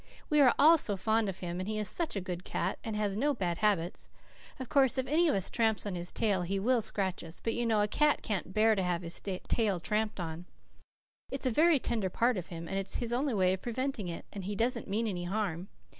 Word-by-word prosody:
We 300 -1 +5
are 255 -4 +6
all 320 +3 +7
so 205 -7 0
fond 220 +2 +1
of 190 - -7
him, 175 0 -4
and 185 +3 -4
he 215 - -2
is 210 -1 0
such 330 - -1
a 195 - -1
good 180 -1 -5
cat, - - -2
and 220 -2 -3
has 205 -2 -1
no 285 +6 +1
bad 175 -6 -2
habits. 195 -5 0 0.5
Of 260 - -5
course, 265 -1 +3
if 260 - +1
any 325 +6 +3
of 300 - +2
us 195 -1 -1
tramps 220 -3 +1
on 205 - -2
his 175 0 -5
tail 200 -5 +1
he 185 +3 -1
will 235 +4 +2
scratch 195 -3 -1
us, 165 0 -10
but 225 - -2
you 240 0 -1
know 215 -2 +3
a - - +1
cat 300 +7 +2
can't 195 -4 -2
bear 220 +3 +4
to 200 - 0
have 180 -1 -1
his 170 0 -3
tail 195 +1 -1
tramped 210 +4 -1
on. 165 0 -5 0.8
It's 270 0 -5
a 255 - +2
very 315 +6 +5
tender 225 -6 -1
part 235 +6 +2
of 180 -3 -4
him, 170 -1 -7
and 195 +3 -2
it's 195 0 -5
his 240 -1 -1
only 260 0 0
way 185 -2 +3
of 190 - -4
preventing 245 -4 -3
it, 170 - -6
and 195 -3 -6
he 205 +1 -3
doesn't 235 +2 0
mean 220 +4 0
any 180 -5 -3
harm. 190 -2 -2
210 Hz, 250 wpm, -31 LUFS, 185-240 Hz, 0.8 s, all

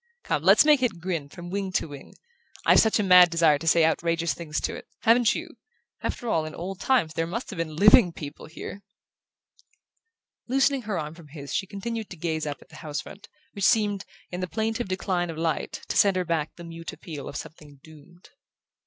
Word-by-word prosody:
Come, - - -1
let's - - +6
make 300 -3 +5
it 225 -9 0
grin 165 -5 -3
from 175 +3 -9
wing 195 -1 -2
to - - 0
wing! 145 -2 -11 0.5
I've - - +7
such 220 - +4
a 210 - +1
mad 180 -2 +8
desire 165 -3 +3
to 165 - -7
say 165 0 +5
outrageous 165 -1 0
things 155 0 -4
to - - -2
it - - -10
haven't 230 0 +4
you? - - -5 0.5
After 240 - -4
all, 165 -8 +1
in 155 0 -7
old 180 +2 -6
times 245 -12 +2
there 165 0 -1
must 230 +9 -5
have - - -8
been 160 -2 -3
living 205 +1 +7
people 150 -2 -9
here!" 185 +4 -8 1.7
Loosening 270 +1 +2
her 210 -5 -3
arm 150 0 -4
from 165 -2 -14
his 140 -1 -8
she 195 - -1
continued 220 +3 -5
to 180 - -9
gaze 160 -1 -2
up 145 -1 -5
at - - -30
the 155 - -13
house 150 -2 -4
front, 205 +1 -13 0.3
which 200 - -5
seemed, 205 -2 +2 0.3
in 180 - -4
the 185 - -2
plaintive 225 +3 -2
decline 185 -2 -1
of 165 - -6
light, 160 -1 -2
to - - -2
send 200 -2 +5
her 185 -1 0
back 160 -2 -2
the 170 - -11
mute 165 0 -7
appeal 150 -4 -8
of - - -9
something 150 -3 -11
doomed. 160 +3 -17
170 Hz, 210 wpm, -26 LUFS, 160-200 Hz, 1.7 s, mad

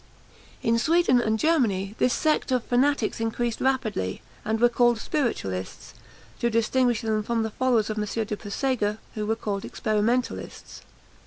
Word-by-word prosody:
In 230 0 +2
Sweden 320 -3 +3
and 220 -1 +1
Germany 220 - +1
this 250 - +3
sect 310 -1 +1
of 250 -2 +1
fanatics 250 -2 +1
increased 225 +1 -2
rapidly, 225 - -1 0.2
and 220 +1 -1
were 240 - +6
called 240 0 +3
spiritualists, 100 - -3 0.5
to 235 - +1
distinguish 235 +1 +2
them 220 -2 0
from 230 +1 -1
the 220 - -3
followers 235 -3 +1
of 215 - -3
M. 210 +1 -2
de 210 - -3
Puysegur, 210 0 -1 0.2
who 210 -1 -3
were 220 - +1
called 205 -3 -3
experimentalists. 225 +4 -2
230 Hz, 150 wpm, -25 LUFS, 215-250 Hz, 0.5 s, were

